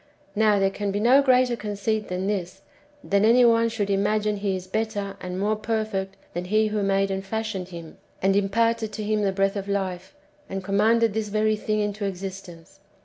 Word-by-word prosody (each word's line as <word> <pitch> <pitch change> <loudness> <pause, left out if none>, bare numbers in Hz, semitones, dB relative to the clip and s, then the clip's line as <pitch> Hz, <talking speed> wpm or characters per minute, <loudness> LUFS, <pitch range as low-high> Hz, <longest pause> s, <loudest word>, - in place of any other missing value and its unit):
Now 210 -1 +4
there 195 0 +2
can 205 +1 -3
be 200 +1 -1
no 250 +6 +5
greater 255 -2 +3
conceit 210 0 -2
than 185 +1 -3
this, 190 -2 -3 0.4
that 200 0 +1
any 240 +3 +6
one 230 0 +4
should 210 -3 -2
imagine 210 +1 +1
he 200 -1 -1
is 185 -1 -6
better 205 0 -3
and 180 0 -5
more 210 +2 +1
perfect 215 -3 -2 0.2
than 175 +1 -3
He 215 +3 +2
who 210 0 -1
made 195 0 +1
and 195 0 -3
fashioned 210 -2 -3
him, 170 -3 -10 0.2
and 195 +1 +2
imparted 220 +2 +1
to 215 - -4
him 210 0 0
the 200 -1 +1
breath 195 +1 0
of 200 -1 -4
life, 190 +2 -3 0.3
and 195 0 -4
commanded 220 +3 +2
this 220 0 -2
very 215 +1 +1
thing 215 0 -1
into 205 0 -2
existence. 190 -2 -7
205 Hz, 195 wpm, -24 LUFS, 195-215 Hz, 0.4 s, any